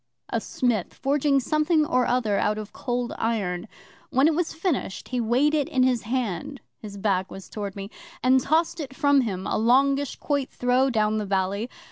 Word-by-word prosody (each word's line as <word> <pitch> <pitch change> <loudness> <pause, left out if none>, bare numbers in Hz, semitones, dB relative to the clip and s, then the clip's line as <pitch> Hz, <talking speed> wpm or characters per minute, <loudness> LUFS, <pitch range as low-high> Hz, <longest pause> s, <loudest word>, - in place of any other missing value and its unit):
'A - - -1
smith 235 -7 -1
forging 280 0 +2
something 305 +4 +2
or 255 -4 +1
other 225 -5 +1
out 210 +1 +1
of 215 -1 -7
Cold 245 -1 -3
Iron. 205 -4 -1 0.4
When 270 +4 +4
it 325 - +3
was 330 +1 -1
finished, 320 - -3
he 250 -1 -1
weighed 250 +7 +2
it 295 -3 +1
in 255 - +2
his 250 -3 +2
hand 255 +3 -3 0.2
(his 205 -2 -9
back 190 -2 0
was 195 - -10
towards 205 -2 -6
me), 200 +1 -7 0.3
and 260 +1 +5
tossed 325 +5 +1
it 275 -4 -6
from 285 -2 +4
him 195 -6 -3
a - - 0
longish 275 +4 +3
quoit 285 -3 -1
throw 250 +2 +2
down 215 -3 +1
the 210 - -3
valley. 195 +4 -1
250 Hz, 185 wpm, -25 LUFS, 210-280 Hz, 0.4 s, and